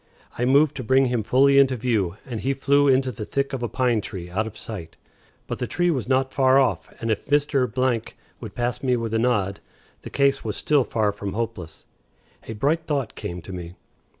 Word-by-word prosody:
I 125 - -1
moved 140 +3 +4
to 130 - -4
bring 130 +3 +4
him 125 -2 0
fully 135 +5 +4
into 135 -1 +4
view, 105 -7 -1
and 120 -5 -5
he 135 +2 0
flew 140 +1 +3
into 130 -1 +3
the 110 - -7
thick 140 +6 -2
of 130 - -3
a 120 - -2
pine 125 -4 +1
tree 90 -4 -7
out 110 +5 -1
of 110 - -10
sight. 85 -8 -8 0.5
But - - -5
the - - -2
tree 175 0 +1
was 130 -5 -3
not 130 0 +1
far 130 -1 +4
off, 135 - 0
and 115 -1 -1
if 105 - -2
Mr. 145 -3 +2 0.7
would - - -9
pass 120 0 -2
me 125 -2 +2
with 115 -1 -3
a 115 - +2
nod, 105 -5 0 0.4
the - - -8
case 140 -1 +2
was 105 -3 -3
still 145 -3 +2
far 110 -3 0
from 100 -1 -6
hopeless. 105 -8 -5 0.6
A 110 - -4
bright 150 +9 0
thought 140 -7 -1
came 85 -1 -6
to 95 - -8
me. 90 -1 -7
125 Hz, 210 wpm, -24 LUFS, 105-135 Hz, 0.7 s, moved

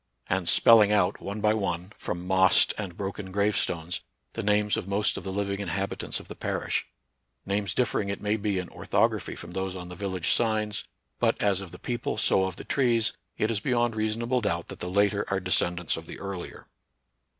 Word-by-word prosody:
37 95 - +2
and 90 - -2
spelling 110 -3 +7
out, 105 -4 +2
one 100 +2 -5
by 105 0 +4
one, 95 -2 -2
from 90 0 -5
mossed 95 0 +5
and 95 -5 -6
broken 100 -1 -5
gravestones, 95 -4 0 0.3
the 115 - -3
names 105 0 +2
of - - -4
most 100 +1 +1
of - - -5
the 95 - -4
living 100 0 -2
inhabitants 100 0 -2
of - - -12
the - - -7
parish, - - -2 0.3
— - - -50
names 100 0 -1
differ 125 -3 +1
ing 100 - -4
it 100 - -3
may 105 +1 0
be 105 -2 -1
in 90 -1 -3
orthography - - 0
from 85 - -9
those 95 +1 -3
on 90 -1 -7
the 90 - -8
village 95 -3 0
signs; 110 -2 +1 0.3
but, - - +2
as 100 -2 +2
of 95 - -8
the - - -11
people, 120 -3 -3
so 95 -2 +3
of 95 -2 -4
the - - -8
trees, 120 -5 +2 0.2
it 110 - +1
is 110 - 0
beyond 120 -2 +1
reasonable 115 +3 0
doubt 85 -5 -1
that - - -8
the 90 - -4
later 100 +1 +2
are 95 - 0
descendants 90 -2 +1
of - - -8
the - - -8
earlier. 100 -3 -6
100 Hz, 205 wpm, -27 LUFS, 95-105 Hz, 0.3 s, spelling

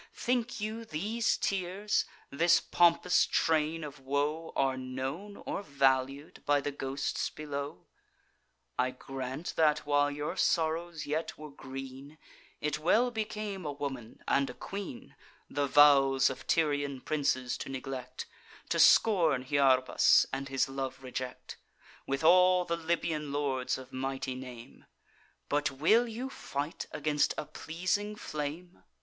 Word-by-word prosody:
Think 240 -1 -1
you 215 +2 -4
these 215 +6 -1
tears, 195 +2 0 0.3
this 165 +4 +4
pompous 175 +1 +3
train 160 0 +1
of 145 -1 -8
woe, 145 +4 -1
Are 135 -1 +2
known 130 +10 -5
or - - -3
valued 135 -2 0
by 145 0 +3
the 145 +1 -3
ghosts 135 0 -2
below? 140 -9 -6 0.9
I 125 0 +3
grant 130 +4 -6
that, 155 -2 +3
while 145 0 +3
your 145 +4 -4
sorrows 165 -2 0
yet 155 +3 -3
were 150 -1 -9
green, 135 +2 -9 0.4
It 150 0 -1
well 225 +10 +3
became 215 -3 -4
a 150 - -3
woman, 135 -5 -6
and 140 0 +2
a - - -8
queen, 195 -10 -7 0.4
The 145 0 0
vows 135 -2 +6
of 130 - -9
Tyrian 145 -4 +1
princes 135 -5 0
to - - -6
neglect, 130 -1 -6 0.4
To - - 0
scorn 165 - +5
Hyarbas, 130 -2 +4
and 135 0 -3
his 135 -1 +1
love 135 -1 -5
reject, 130 0 -6 0.5
With 135 +2 -1
all 180 +2 +6
the 170 - -1
Libyan 160 -3 -2
lords 140 -3 -1
of 130 -1 -12
mighty 130 0 -3
name; 125 -1 -10 0.6
But 145 -1 +1
will 170 - +3
you 245 +4 -5
fight 145 - -4
against 150 -1 +1
a - - -3
pleasing 185 +7 -2
flame! 160 0 -6
145 Hz, 130 wpm, -31 LUFS, 135-170 Hz, 0.9 s, vows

